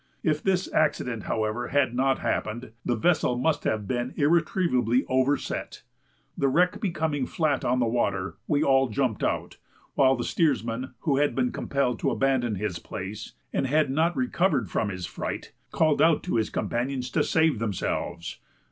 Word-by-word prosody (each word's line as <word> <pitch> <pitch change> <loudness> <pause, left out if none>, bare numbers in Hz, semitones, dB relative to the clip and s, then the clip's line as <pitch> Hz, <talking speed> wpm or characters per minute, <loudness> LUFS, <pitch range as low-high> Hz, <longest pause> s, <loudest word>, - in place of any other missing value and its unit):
If 155 -2 +1
this 190 -1 +1
accident, 125 -7 0
however, 110 +2 -1
had 135 -3 +1
not 135 +2 +2
happened, 110 +2 -3
the 120 - 0
vessel 125 -1 +2
must 150 +5 0
have 105 -2 -1
been 120 +2 -2
irretrievably 145 - +2
overset. 130 +2 -1 0.5
The 140 - +1
wreck 180 +8 +2
becoming 160 - -1
flat 150 -5 0
on 125 +1 +1
the 120 - +2
water, 100 -5 -1
we 150 -1 +2
all 135 -1 +3
jumped 115 -1 -1
out, - - -2 0.4
while 135 -1 +4
the 120 - -3
steersman, 125 - 0
who 140 -3 +1
had 145 +1 +2
been 250 0 +1
compelled 130 - -1
to - - +1
abandon 130 -5 +1
his 95 -3 -3
place, 100 +4 -7 0.2
and 135 - 0
had 150 0 +2
not 160 +5 +1
recovered 185 - +1
from 110 - 0
his 90 -2 -5
fright, - - -5 0.2
called 155 -2 +2
out 165 -1 +4
to 180 - -1
his 110 -2 0
companions 125 +1 -2
to - - +2
save 160 -7 +2
themselves. 90 -5 -3
130 Hz, 165 wpm, -26 LUFS, 115-155 Hz, 0.5 s, while